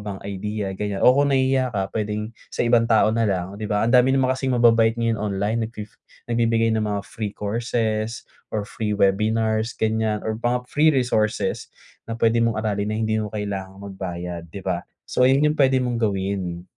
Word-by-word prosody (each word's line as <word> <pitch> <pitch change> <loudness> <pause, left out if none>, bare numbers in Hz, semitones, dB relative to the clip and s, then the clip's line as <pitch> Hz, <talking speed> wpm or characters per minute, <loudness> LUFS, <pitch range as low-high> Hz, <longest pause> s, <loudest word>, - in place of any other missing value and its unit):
bang 100 -2 -6
idea 105 +1 -4
ganyan 100 -1 -3
o 125 - +8
kung 140 +1 +3
nahihiya 130 -1 +2
ka 95 -1 -1
puwedeng 105 0 -2 0.2
sa - - -1
ibang 115 -1 +4
tao 110 -2 +4
na 115 -1 +2
lang 95 0 -2
di 105 - -3
ba, 105 0 +1
ang 115 - +1
dami 125 +1 +5
naman 130 -1 +2
kasing 130 -1 -1
mababait 115 -2 +4
ngayon 115 -1 0
online 105 +2 -1
nag 115 - -14
fi 105 - -5 0.5
nagbibigay 115 -1 +2
ng 110 - 0
mga 100 -1 -2
free 105 -2 -5
courses 110 +1 -2 0.3
or 105 - 0
free 105 -1 -3
webinars 110 +3 +1
ganyan 110 -1 0
or 110 0 -3
mga 120 +1 0
free 155 +2 +4
resources 110 -5 0 0.4
na 115 - -3
puwede 115 0 +3
mong 115 -1 +1
aralin 105 -1 -1
na 110 - -2
hindi 110 0 0
mo 105 - -3
kailangang 100 -2 -5
magbayad, 90 -2 -5
di 100 - -6
ba? 90 -2 -2 0.2
So 125 - +1
yun, 135 +2 +4
yun 150 0 +3
puwede 135 -2 +4
mong 120 -2 -1
gawin. 95 -4 -2
110 Hz, 195 wpm, -23 LUFS, 100-115 Hz, 0.5 s, o